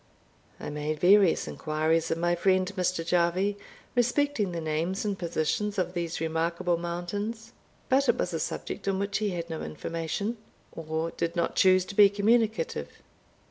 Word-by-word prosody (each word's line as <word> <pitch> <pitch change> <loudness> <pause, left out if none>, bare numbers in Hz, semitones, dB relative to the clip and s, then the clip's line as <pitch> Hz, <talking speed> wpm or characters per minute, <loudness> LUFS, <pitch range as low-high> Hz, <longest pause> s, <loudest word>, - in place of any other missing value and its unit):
I - - -5
made 150 +1 -3
various 190 0 +5
inquiries 160 +1 0
of 165 - 0
my 175 +1 +1
friend 185 +2 +2
Mr. 180 -2 -1
Jarvie 180 +4 +1 0.4
respecting 245 -3 +1
the 170 - -3
names 165 +5 -2
and 205 -1 0
positions 180 +4 -1
of 180 -1 -1
these 170 -2 -3
remarkable 170 +2 0
mountains; 205 +7 -4 0.4
but 265 0 +3
it - - +4
was 180 - -2
a 165 - -1
subject 165 - -4
on 195 -1 +1
which 200 0 -1
he 210 -1 0
had 170 -3 -4
no 160 -1 -5
information, 165 +9 -3 0.3
or 160 0 -3
did 170 +1 -3
not 170 -1 0
choose 185 -1 +5
to 200 - -8
be 200 0 +7
communicative. 220 - +1
180 Hz, 160 wpm, -28 LUFS, 165-205 Hz, 0.4 s, be